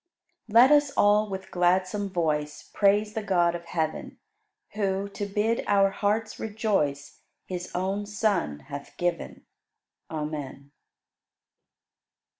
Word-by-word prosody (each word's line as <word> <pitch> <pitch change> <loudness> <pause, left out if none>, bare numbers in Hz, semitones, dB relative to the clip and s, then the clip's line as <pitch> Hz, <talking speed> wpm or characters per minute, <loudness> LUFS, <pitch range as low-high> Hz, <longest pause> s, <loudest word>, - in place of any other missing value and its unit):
96. 210 - -12
Let 250 +4 +8
us 290 -1 +2
all 210 +1 +4
with 190 -1 -6
gladsome 185 +3 +1
voice 150 -4 -2
Praise 210 +1 +3
the 220 - -2
God 175 -4 +2
of 170 0 -6
heaven, 160 -2 -3 0.6
Who, 200 -1 -1
to 200 0 -5
bid 210 +3 0
our 195 -1 +4
hearts 215 +2 -1
rejoice, 205 -11 -1 0.3
His 180 -1 -5
own 195 +3 -2
Son 205 - -1
hath 140 0 -9
given. 175 -1 -3 0.6
Amen. 150 -3 -5
195 Hz, 115 wpm, -26 LUFS, 170-210 Hz, 0.6 s, Let